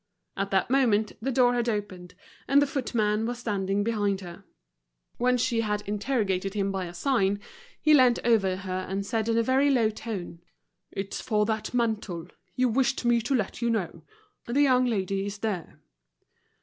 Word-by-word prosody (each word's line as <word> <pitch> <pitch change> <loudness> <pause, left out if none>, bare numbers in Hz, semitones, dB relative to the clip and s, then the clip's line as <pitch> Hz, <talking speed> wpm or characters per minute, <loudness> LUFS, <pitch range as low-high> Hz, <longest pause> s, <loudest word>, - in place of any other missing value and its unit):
At 195 0 -2
that 195 +4 +1
moment 225 -6 +3
the 265 +4 -1
door 245 -1 +4
had 240 -1 0
opened 185 -5 -4 0.3
and 280 +1 +5
the 285 - +4
footman 225 -6 0
was 245 0 -3
standing 200 -3 -1
behind 205 -3 0
her. 175 +1 -10 0.7
When 250 +1 +2
she 235 -1 +1
had 210 -1 -1
interrogated 205 -3 -1
him 195 -1 0
by 190 -1 -2
a 170 - -8
sign, 205 -2 +1 0.4
he 305 - +4
leant 255 -4 +6
over 205 -6 +3
her 185 -1 -4
and 195 +1 -2
said 225 +1 -1
in 230 - +2
a 230 - +3
very 265 +4 +3
low 235 -5 +3
tone: 195 -6 -6 0.5
"It's 195 0 -4
for 210 -2 +1
that 220 +2 -3
mantle. 210 -8 -1 0.3
You 255 0 +2
wished 255 +1 +1
me 240 -1 +3
to 250 +5 0
let 215 -2 -2
you 235 - +1
know. 215 -7 -2 0.5
The 270 +5 +3
young 255 -2 +4
lady 195 -3 -1
is 205 0 -5
there." 200 -5 -4
215 Hz, 175 wpm, -27 LUFS, 195-245 Hz, 0.7 s, leant